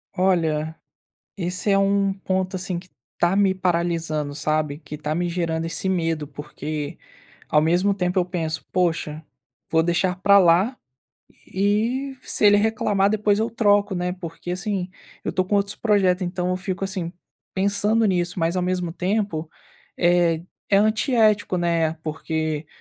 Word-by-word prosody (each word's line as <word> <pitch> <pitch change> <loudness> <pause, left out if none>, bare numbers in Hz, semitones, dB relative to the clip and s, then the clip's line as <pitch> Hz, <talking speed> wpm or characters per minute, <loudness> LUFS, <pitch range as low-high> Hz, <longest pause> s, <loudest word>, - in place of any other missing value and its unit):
Olha, 160 -4 +1 0.6
esse 180 +2 -2
é 195 - +4
um 195 0 +2
ponto, 190 -1 -2
assim, 185 -1 -3
que 185 +1 -16 0.3
tá 175 +2 +3
me 195 -1 +3
paralisando, 170 -5 -1
sabe, 155 -1 -1
que 150 -1 -8
tá 150 +1 -3
me 175 +2 -1
gerando 165 -2 -1
esse 165 +3 -2
medo, 165 -5 0
porque 150 +1 -6 0.5
ao 150 - +3
mesmo 175 +5 +2
tempo 180 -1 -1
eu 180 - +3
penso: 160 -5 -3
“Poxa, 165 -4 -1 0.5
vou 160 0 +3
deixar 175 +2 0
pra 200 +1 +7
lá 185 +7 +4 0.7
e, 225 +8 0
se - - 0
ele 205 0 +7
reclamar, 205 -2 +2
depois 210 -1 +2
eu 225 +1 0
troco, 205 -3 +2
né”, 180 0 -1
porque 175 -1 -7
assim, 190 0 -2 0.4
eu - - -3
tô 185 - +2
com 200 +3 -1
outros 200 0 0
projetos, 195 -4 +2
então, 180 0 -2
eu 185 - 0
fico, 190 0 -4
assim, 185 -3 -3 0.4
pensando 205 +3 +2
nisso, 175 -3 0
mas 165 +2 +1
ao 180 - +1
mesmo 180 -2 -1
tempo, 185 -4 -1 0.5
é 175 -2 +3 0.3
é 195 - +5
antiético, 215 -2 +2
né, 170 -2 +1
porque 155 -1 -3
180 Hz, 155 wpm, -23 LUFS, 165-200 Hz, 0.7 s, pra